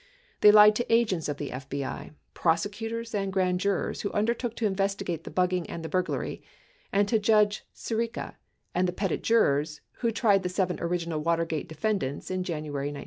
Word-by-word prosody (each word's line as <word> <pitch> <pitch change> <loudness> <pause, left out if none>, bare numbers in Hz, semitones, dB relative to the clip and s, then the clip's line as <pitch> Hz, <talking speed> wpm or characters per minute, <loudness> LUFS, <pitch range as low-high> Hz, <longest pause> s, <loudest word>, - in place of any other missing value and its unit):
They 210 - +8
lied 210 0 +8
to 240 - -2
agents 210 -9 +2
of 145 - -3
the 145 -2 -5
FBI, 135 +3 -5 0.2
prosecutors, 225 +7 -1
and 195 -2 -1
grand 185 -1 +1
jurors 200 0 -1
who 200 - -3
undertook 235 +2 0
to 230 - -2
investigate 195 -4 -1
the - - -6
bugging 180 -1 0
and 165 -1 -6
the - - -4
burglary, 185 0 -2 0.5
and 200 +1 +2
to 225 +1 +2
Judge 210 0 +3
Sirica 230 +1 -3 0.4
and 180 +1 +2
the 180 - -2
petit 195 0 -1
jurors 150 -9 +2 0.2
who 235 - 0
tried 210 -3 +3
the 180 - -2
seven 180 -1 -1
original 170 -2 -2
Water 165 +1 +1
gate 160 -2 -4
defendants 160 -3 -2
in 185 0 -1
January 150 -5 -3
1973. 145 -1 -5
185 Hz, 180 wpm, -27 LUFS, 165-210 Hz, 0.5 s, They